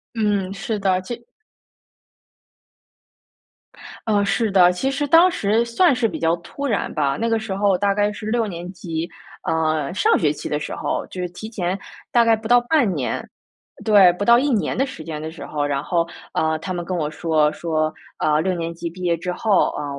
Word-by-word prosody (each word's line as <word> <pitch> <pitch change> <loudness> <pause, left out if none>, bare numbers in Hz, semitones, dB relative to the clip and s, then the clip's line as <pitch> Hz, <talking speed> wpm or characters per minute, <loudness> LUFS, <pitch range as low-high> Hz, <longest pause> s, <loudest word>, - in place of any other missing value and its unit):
嗯， 205 -4 0
是 215 +2 -3
的， 190 -2 +1
介 235 +5 -7 2.8
呃， 205 -2 +2
是 220 +2 +1
的。 180 -2 +6
其 180 +10 -1
实 280 +2 -1
当 330 +5 +7
时 220 - +1
算 260 +7 +3
是 245 -2 +1
比 165 -7 -6
较 165 +1 +2
突 280 +11 -7
然 225 -7 -1
吧， 140 -2 0
那 230 +1 0
个 225 - +2
时 220 -3 -4
候 200 -2 +2
大 200 +1 +2
概 205 +1 +1
是 210 +1 -8
六 225 0 +1
年 175 -1 -6
级， 165 -2 -4 0.4
呃， 155 -1 0
上 - - +3
学 150 -3 +2
期 - - -6
的 150 - -1
时 150 - -5
候。 - - -2
就 185 - -6
是 180 - -3
提 215 +5 -8
前 185 -4 -2 0.3
大 235 -1 +5
概 230 -1 +4
不 220 0 -7
到 245 +1 +6
半 245 -5 +2
年 130 -5 -3 0.6
对， 200 -4 +7
不 200 +3 -3
到 235 +2 +7
一 285 +3 +1
年 225 -6 0
的 270 - +2
时 165 -11 -8
间 155 -1 -6
的 160 +1 -5
时 160 - -9
候， 145 -1 -2
然 140 -1 -1
后， 170 +2 0 0.3
呃， 160 0 +1
他 185 +3 -4
们 175 - -3
跟 185 +2 -3
我 150 -2 -1
说 155 -2 +1
说 155 -1 -1 0.3
呃， 155 0 +2
六 185 +2 0
年 170 -1 -3
级 170 0 -5
毕 180 +2 -12
业 175 -2 +1
之 180 +2 -4
后， 205 0 +2
呃， - - -4
185 Hz, 220 characters per minute, -21 LUFS, 165-220 Hz, 2.8 s, 当